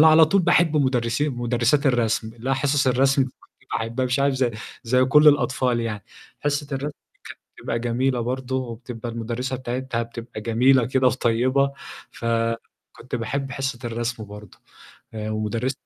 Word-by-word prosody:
أنا 160 - +8
على 160 +1 +8
طول 195 +4 +2
باحب 165 -2 +3
مدرسين 130 0 +1
مدرسات 120 +4 +1
الرسم 115 -3 +1
اللي 120 +3 -4
هي - - +3
حصص 140 0 +1
الرسم 135 +1 +3
فكنت 130 - -16
باحبّها 115 +3 -1
مش 125 +2 0
عارف 140 -1 +2
ز 130 -2 +1 0.3
زي 125 +2 +3
كل 150 +3 +6
الأطفال 130 -4 +2
يعني، 110 -3 -4 0.4
حصّة 145 0 -1
الرسم - - 0 0.6
كانت - - -22
بتبقى 115 - -2
جميلة 120 +2 0
برضه 130 +2 -3
وبتبقى 120 -1 -6
المُدرِّسة 120 +3 -3
بتاعتها 125 -1 -3
بتبقى 115 -1 -8
جميلة 120 +3 +3
كده 130 0 +2
وطيبة، 130 +2 +2 0.4
فكنت 115 +1 -4
باحب 130 +4 -3
حصة 135 -1 -3
الرسم 115 -1 -3
برضه 105 -1 -12 0.6
آآ، 110 0 -4
ومدرس 110 +4 -1
125 Hz, 150 wpm, -23 LUFS, 115-135 Hz, 0.6 s, أنا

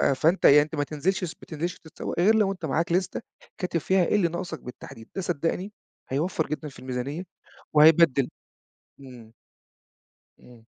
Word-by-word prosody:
فأنت 160 +8 +2
يعني 145 +1 +8
أنت 150 +2 -4
ما 145 - 0
تنزلش 170 +7 -1
السب 175 -1 -5
ما - - -11
تنزلش 170 +2 -4
تتسوق، 160 - -6
غير 205 +6 +5
لو 210 -3 +3
أنت 180 -4 -6
معاك 160 +3 0
لِستة، 185 +6 0 0.4
كاتب 180 -3 -1
فيها 185 +3 +2
إيه - - +1
اللي 195 -5 +3
ناقصك 170 -1 -5
بالتحديد. 115 -2 -11
ده 195 - -2
صدّقني 175 +4 -2 0.4
هيوَفّر 160 +4 -1
جدًا 155 +1 -4
في 140 - -14
الميزانية 130 +6 -4 0.5
وهيبدّل 150 -3 +6 0.7
إمم. 120 -4 -13 1.1
امم. 120 -2 -17
160 Hz, 160 wpm, -26 LUFS, 140-180 Hz, 1.1 s, يعني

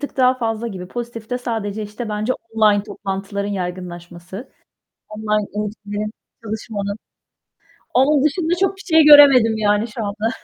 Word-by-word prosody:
tık 285 - -6
daha 255 -1 +4
fazla 225 -1 -2
gibi. 185 -4 -8
Pozitifte 240 +1 -5
sadece, 220 -4 -3
işte, 215 +3 -6
bence 215 +3 -1 0.2
online 210 -2 +3
toplantıların 200 0 -4
yaygınlaşması. 180 +2 -7 0.6
Online 215 -1 -1
eğitimlerin, 210 0 -4 0.3
çalışmanın 210 -2 -4 1.0
Onun 275 +2 +4
dışında 325 +3 +1
çok 385 0 +1
bir 390 - -11
şey 320 -2 +4
göremedim, 275 -7 +8
yani, 210 +1 +1
şu 220 0 -5
anda. 210 +2 -2
215 Hz, 130 wpm, -20 LUFS, 205-245 Hz, 1.0 s, göremedim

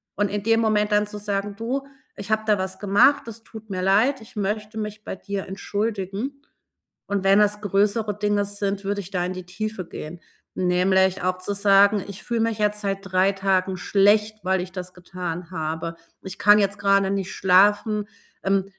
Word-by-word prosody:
und 205 0 0
in 205 0 -3
dem 225 +1 +3
Moment 210 -1 +1
dann 210 0 +3
zu 210 0 -8
sagen: 200 0 -3
„Du, 265 +4 -3 0.3
ich 205 +2 -7
habe 215 0 +2
da 210 -2 +4
was 190 0 -4
gemacht, 205 +8 +4
das 230 0 -8
tut 220 -1 -12
mir 185 -1 -3
leid. 220 +8 +3
Ich 230 +2 -15
möchte 210 +2 -3
mich 210 0 -6
bei - - -5
dir 200 -1 -5
entschuldigen.“ 205 +6 -3 0.7
Und 200 -1 -1
wenn 195 +1 +6
das 210 0 +2
größere 205 +1 +1
Dinge 205 -1 +1
sind, 200 -1 -3
würde 200 0 -1
ich 190 - -12
da 180 -2 -1
in 185 - -3
die 185 -1 -8
Tiefe 200 0 -5
gehen, 165 +3 -8 0.3
nämlich 185 +1 +2
auch 185 0 0
zu 200 +2 -3
sagen: 200 0 +4
„Ich 200 0 -9
fühle 235 -2 -1
mich 225 -1 0
jetzt 210 0 0
seit 195 -1 -2
3 190 0 +2
Tagen 190 -1 0
schlecht, 210 +3 +2
weil 185 0 +1
ich 180 - -7
das 180 -1 -7
getan 180 -1 -6
habe. 160 0 -4 0.3
Ich 190 - -7
kann 205 0 +6
jetzt 200 0 0
grade 195 -1 +3
nicht 195 -2 -2
schlafen. 205 +3 +3 0.4
Ähm, 195 -1 +1
200 Hz, 190 wpm, -23 LUFS, 190-210 Hz, 0.7 s, wenn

